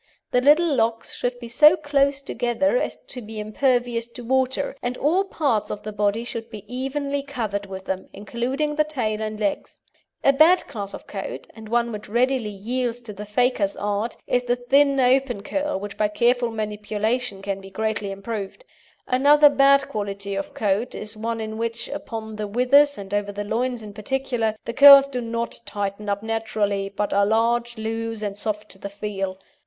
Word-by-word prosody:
The 250 Hz, -, +3 dB
little 300 Hz, +4 st, +5 dB
locks 225 Hz, -2 st, 0 dB
should 245 Hz, 0 st, -2 dB
be 240 Hz, -, -8 dB
so 300 Hz, +8 st, +6 dB
close 280 Hz, -2 st, +1 dB
together 245 Hz, -, 0 dB
as -, -, -1 dB
to 250 Hz, -, -6 dB
be 220 Hz, -1 st, -8 dB
impervious 240 Hz, +1 st, 0 dB
to 240 Hz, +1 st, -10 dB
water, 260 Hz, +2 st, 0 dB
and 245 Hz, 0 st, -3 dB
all 340 Hz, +7 st, +2 dB
parts 275 Hz, -, 0 dB
of 210 Hz, -, -5 dB
the 215 Hz, -, -5 dB
body 210 Hz, +2 st, 0 dB
should 230 Hz, -1 st, -6 dB
be 215 Hz, -3 st, -9 dB
evenly 280 Hz, +3 st, -2 dB
covered 220 Hz, -8 st, -4 dB
with 190 Hz, -1 st, -8 dB
them, 190 Hz, 0 st, -4 dB
including 255 Hz, +8 st, -2 dB
the 305 Hz, +1 st, +3 dB
tail 235 Hz, -8 st, -2 dB
and 215 Hz, 0 st, -4 dB
legs. 205 Hz, -2 st, -2 dB, 0.5 s
A 275 Hz, -, +5 dB
bad 325 Hz, +6 st, +5 dB
class 200 Hz, -3 st, -5 dB
of -, -, -11 dB
coat, -, -, -6 dB
and 220 Hz, -1 st, -11 dB
one 235 Hz, 0 st, +1 dB
which 210 Hz, -1 st, -7 dB
readily 245 Hz, 0 st, +1 dB
yields 235 Hz, +4 st, -3 dB
to 225 Hz, -3 st, -8 dB
the 205 Hz, +1 st, -8 dB
faker's 210 Hz, -2 st, +1 dB
art, 205 Hz, +3 st, -2 dB
is 250 Hz, -, +1 dB
the 245 Hz, 0 st, 0 dB
thin 275 Hz, +3 st, +3 dB
open 255 Hz, -4 st, +2 dB
curl 290 Hz, -3 st, -2 dB
which 205 Hz, 0 st, -7 dB
by 210 Hz, -, +2 dB
careful 240 Hz, +3 st, +2 dB
manipulation 215 Hz, 0 st, -2 dB
can 195 Hz, -1 st, -3 dB
be 195 Hz, -, -11 dB
greatly 215 Hz, 0 st, -2 dB
improved. 200 Hz, -, -6 dB, 0.4 s
Another 290 Hz, +3 st, +6 dB
bad 275 Hz, 0 st, +5 dB
quality 200 Hz, -1 st, -4 dB
of 290 Hz, +7 st, -4 dB
coat 210 Hz, +4 st, 0 dB
is 215 Hz, +1 st, -5 dB
one 225 Hz, +1 st, -3 dB
in 220 Hz, 0 st, -5 dB
which, 230 Hz, 0 st, -3 dB
upon 220 Hz, -2 st, -6 dB
the 210 Hz, -1 st, -3 dB
withers 275 Hz, +6 st, +4 dB
and 200 Hz, 0 st, -8 dB
over 205 Hz, 0 st, 0 dB
the 205 Hz, +1 st, -4 dB
loins 240 Hz, +2 st, -2 dB
in 210 Hz, -1 st, -9 dB
particular, 230 Hz, 0 st, -1 dB
the 235 Hz, -, -4 dB
curls 280 Hz, +1 st, +10 dB
do 255 Hz, -3 st, -4 dB
not 230 Hz, 0 st, -3 dB
tighten 205 Hz, 0 st, -3 dB
up 200 Hz, +1 st, -1 dB
naturally, 215 Hz, -3 st, -1 dB
but 200 Hz, +1 st, -2 dB
are 200 Hz, +1 st, +4 dB
large, 235 Hz, +2 st, +1 dB
loose, 225 Hz, 0 st, -3 dB
and 200 Hz, -1 st, -3 dB
soft 210 Hz, 0 st, -3 dB
to 190 Hz, -, -15 dB
the 200 Hz, -, -6 dB
feel. 195 Hz, -2 st, -4 dB
230 Hz, 185 wpm, -23 LUFS, 210-255 Hz, 0.5 s, curls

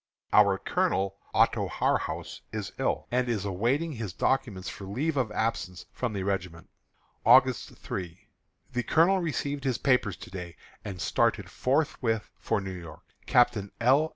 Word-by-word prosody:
Our 100 Hz, -2 st, +6 dB
Colonel, 95 Hz, +1 st, 0 dB
Otto -, -, +3 dB
Harhaus, -, -, -1 dB
is -, -, -4 dB
ill, -, -, 0 dB
and 125 Hz, 0 st, +1 dB
is 105 Hz, -4 st, -1 dB
awaiting 120 Hz, -, 0 dB
his 110 Hz, -, -5 dB
documents 110 Hz, -8 st, 0 dB
for 100 Hz, -, -6 dB
a -, -, -8 dB
leave 145 Hz, +9 st, -1 dB
of 125 Hz, -6 st, 0 dB
absence 105 Hz, -5 st, -2 dB
from 125 Hz, -4 st, -2 dB
the 100 Hz, -2 st, -2 dB
regiment. 90 Hz, -4 st, -3 dB, 0.5 s
August 130 Hz, -3 st, +5 dB
3. 90 Hz, -2 st, -5 dB, 0.5 s
The 125 Hz, -, +1 dB
colonel 170 Hz, +9 st, +4 dB
received 145 Hz, -4 st, -2 dB
his 130 Hz, -4 st, 0 dB
papers 125 Hz, -8 st, +2 dB
to -, -, -11 dB
day, 90 Hz, -3 st, -7 dB, 0.3 s
and 95 Hz, -3 st, -6 dB
started -, -, +1 dB
forthwith 125 Hz, -5 st, 0 dB
for -, -, 0 dB
New 95 Hz, -1 st, -5 dB
York. 85 Hz, -3 st, -10 dB, 0.2 s
Captain 120 Hz, -5 st, +3 dB
L. 135 Hz, +6 st, +4 dB
110 Hz, 155 wpm, -28 LUFS, 95-130 Hz, 0.5 s, Our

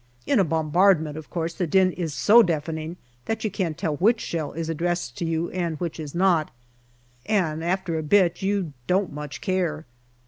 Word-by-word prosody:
In 275 Hz, -, +3 dB
a -, -, +5 dB
bombardment, 160 Hz, 0 st, +2 dB
of 155 Hz, -1 st, -9 dB
course, 165 Hz, -1 st, -3 dB
the 180 Hz, -1 st, -2 dB
din 185 Hz, +3 st, +4 dB
is 170 Hz, -3 st, -4 dB
so 205 Hz, -, +6 dB
deafening 160 Hz, -2 st, -2 dB, 0.3 s
that 225 Hz, -, -2 dB
you 215 Hz, -, -1 dB
can't 175 Hz, -6 st, -2 dB
tell 160 Hz, -5 st, -2 dB
which 225 Hz, +7 st, +3 dB
shell 160 Hz, -4 st, -3 dB
is 165 Hz, 0 st, -4 dB
addressed 170 Hz, -4 st, -2 dB
to 170 Hz, -, -1 dB
you 165 Hz, +1 st, -1 dB
and 170 Hz, -4 st, -2 dB
which 170 Hz, -2 st, -4 dB
is 150 Hz, 0 st, -7 dB
not 175 Hz, -4 st, +3 dB, 0.8 s
and 160 Hz, -7 st, 0 dB
after 175 Hz, -2 st, -1 dB
a -, -, -2 dB
bit 175 Hz, +2 st, +3 dB
you 190 Hz, -5 st, -1 dB
don't 185 Hz, -2 st, +1 dB
much 150 Hz, -1 st, -7 dB
care. 175 Hz, -5 st, -1 dB
170 Hz, 185 wpm, -24 LUFS, 155-185 Hz, 0.8 s, so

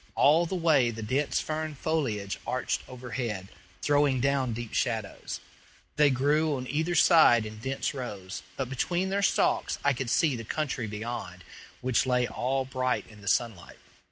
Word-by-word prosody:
All 160 Hz, +4 st, +5 dB
the 190 Hz, -, -3 dB
way 155 Hz, -8 st, +3 dB
the 115 Hz, -1 st, -6 dB
dense 135 Hz, +7 st, 0 dB
fern 155 Hz, -1 st, -3 dB
foliage 125 Hz, -11 st, -2 dB
arched 130 Hz, -, -1 dB
overhead, 120 Hz, -6 st, -5 dB, 0.3 s
throwing 145 Hz, -2 st, +3 dB
down 135 Hz, -1 st, +1 dB
deep 115 Hz, 0 st, -5 dB
shadows. -, -, -2 dB, 0.6 s
They 150 Hz, -1 st, +5 dB
grew 145 Hz, +3 st, +2 dB
on 130 Hz, -1 st, -4 dB
either 160 Hz, +4 st, 0 dB
side 155 Hz, -11 st, +6 dB
in 110 Hz, 0 st, -8 dB
dense 130 Hz, +4 st, -2 dB
rows, 100 Hz, -8 st, -6 dB, 0.2 s
but 135 Hz, -, -2 dB
between 175 Hz, +8 st, -1 dB
their 200 Hz, +1 st, +1 dB
stalks 195 Hz, -, +2 dB
I 145 Hz, -, +4 dB
could 125 Hz, -1 st, -3 dB
see 145 Hz, +1 st, +3 dB
the 115 Hz, -, -6 dB
country 130 Hz, -2 st, -2 dB
beyond, 105 Hz, -4 st, -6 dB, 0.4 s
which 130 Hz, 0 st, +1 dB
lay 125 Hz, -1 st, +2 dB
all 130 Hz, +3 st, -1 dB
bright 130 Hz, -1 st, -1 dB
in 105 Hz, -2 st, -15 dB
the 100 Hz, -, -12 dB
sunlight. 100 Hz, -4 st, -1 dB
130 Hz, 160 wpm, -28 LUFS, 115-150 Hz, 0.6 s, side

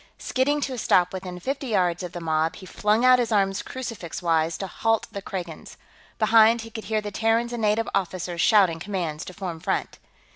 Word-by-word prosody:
Skidding 285 Hz, +3 st, 0 dB
to 270 Hz, -, -2 dB
a 250 Hz, -, -5 dB
stop 180 Hz, -3 st, +3 dB
within 185 Hz, -1 st, -6 dB
fifty 275 Hz, +7 st, -3 dB
yards 180 Hz, -6 st, +1 dB
of 180 Hz, -2 st, -5 dB
the 175 Hz, -, -6 dB
mob, 160 Hz, -1 st, 0 dB
he 190 Hz, -, -11 dB
flung 210 Hz, +5 st, +1 dB
out 255 Hz, 0 st, +7 dB
his 235 Hz, -2 st, 0 dB
arms 195 Hz, -2 st, +2 dB
crucifix 230 Hz, -10 st, -6 dB
wise 165 Hz, -2 st, +1 dB
to 195 Hz, -, -4 dB
halt 225 Hz, +4 st, 0 dB
the 200 Hz, -, -6 dB
Kragans. 175 Hz, -5 st, -7 dB, 0.4 s
Behind, 225 Hz, +1 st, +5 dB
he 225 Hz, 0 st, -10 dB
could 220 Hz, 0 st, -7 dB
hear 220 Hz, -1 st, 0 dB
the 205 Hz, 0 st, -6 dB
Terrans 225 Hz, +3 st, +1 dB
and 235 Hz, -, -3 dB
native 215 Hz, +1 st, +1 dB
officers 180 Hz, -2 st, -2 dB
shouting 190 Hz, -6 st, +4 dB
commands 170 Hz, -5 st, -3 dB
to 185 Hz, -, -9 dB
form 180 Hz, -5 st, -5 dB
front. -, -, -2 dB
200 Hz, 205 wpm, -25 LUFS, 175-225 Hz, 0.4 s, out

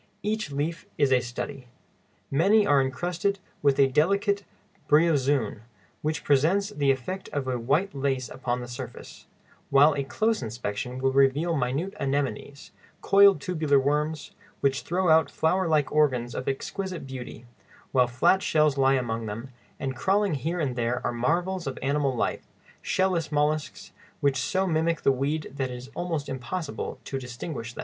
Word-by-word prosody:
Each 210 Hz, -6 st, -2 dB
leaf 155 Hz, +4 st, -3 dB
is 140 Hz, -2 st, +3 dB
a 130 Hz, -, +5 dB
study. 125 Hz, +2 st, -6 dB, 0.6 s
Many 200 Hz, +9 st, +4 dB
are 145 Hz, -5 st, +4 dB
encrusted 175 Hz, +9 st, -1 dB, 0.2 s
with 140 Hz, -2 st, +3 dB
a 140 Hz, -, +7 dB
delicate 200 Hz, -, +2 dB, 0.5 s
bryozoön, 145 Hz, -8 st, +3 dB, 0.4 s
which 155 Hz, +3 st, -2 dB
presents 165 Hz, +9 st, +2 dB
the 145 Hz, -8 st, 0 dB
effect 135 Hz, +9 st, -2 dB
of 145 Hz, -2 st, -3 dB, 0.2 s
white 165 Hz, +9 st, +2 dB
lace 135 Hz, -2 st, -1 dB
upon 125 Hz, -1 st, -3 dB
the 120 Hz, -, -7 dB
surface, 120 Hz, 0 st, -9 dB, 0.4 s
while 145 Hz, +3 st, +6 dB
a 140 Hz, -, -1 dB
close 220 Hz, +11 st, 0 dB
inspection 120 Hz, +1 st, -4 dB
will 135 Hz, +1 st, +1 dB
reveal 140 Hz, +5 st, +3 dB
minute 140 Hz, +8 st, -1 dB
anemones, 140 Hz, 0 st, -3 dB, 0.3 s
coiled 200 Hz, -3 st, +6 dB
tubular 155 Hz, -3 st, +1 dB
worms, 150 Hz, +2 st, -1 dB, 0.3 s
which 135 Hz, -1 st, +1 dB
throw 180 Hz, +2 st, -1 dB
out 160 Hz, 0 st, +5 dB
flower 180 Hz, +3 st, +1 dB
like 150 Hz, -3 st, +2 dB
organs 130 Hz, -6 st, +2 dB
of 130 Hz, -, -5 dB
exquisite 180 Hz, +5 st, -3 dB
beauty; 125 Hz, -3 st, -8 dB, 0.5 s
while 125 Hz, -2 st, +4 dB
flat 130 Hz, +10 st, +3 dB
shells 150 Hz, -5 st, +2 dB
lie 135 Hz, 0 st, +4 dB
among 115 Hz, -3 st, -2 dB
them, 115 Hz, +5 st, -6 dB, 0.3 s
and 135 Hz, -1 st, -3 dB
crawling 195 Hz, +6 st, +1 dB
here 160 Hz, +5 st, -2 dB
and 135 Hz, -6 st, -1 dB
there 120 Hz, +1 st, -1 dB
are -, -, 0 dB
marvels 170 Hz, +8 st, -1 dB
of 135 Hz, -, -4 dB
animal 140 Hz, -1 st, +1 dB
life, -, -, -2 dB, 0.3 s
shell 190 Hz, 0 st, +1 dB
less 165 Hz, -4 st, -2 dB
mollusks, 150 Hz, +1 st, -1 dB, 0.3 s
which 140 Hz, -2 st, +2 dB
so 185 Hz, +9 st, 0 dB
mimic 165 Hz, -1 st, 0 dB
the -, -, +5 dB
weed 140 Hz, +4 st, -2 dB
that 135 Hz, -2 st, -2 dB
it 125 Hz, -, -6 dB
is 125 Hz, +2 st, -10 dB
almost 165 Hz, -5 st, -3 dB
impossible 140 Hz, +5 st, -4 dB
to 135 Hz, -, -4 dB
distinguish 120 Hz, 0 st, -6 dB
them. -, -, -13 dB
145 Hz, 160 wpm, -26 LUFS, 130-165 Hz, 0.6 s, a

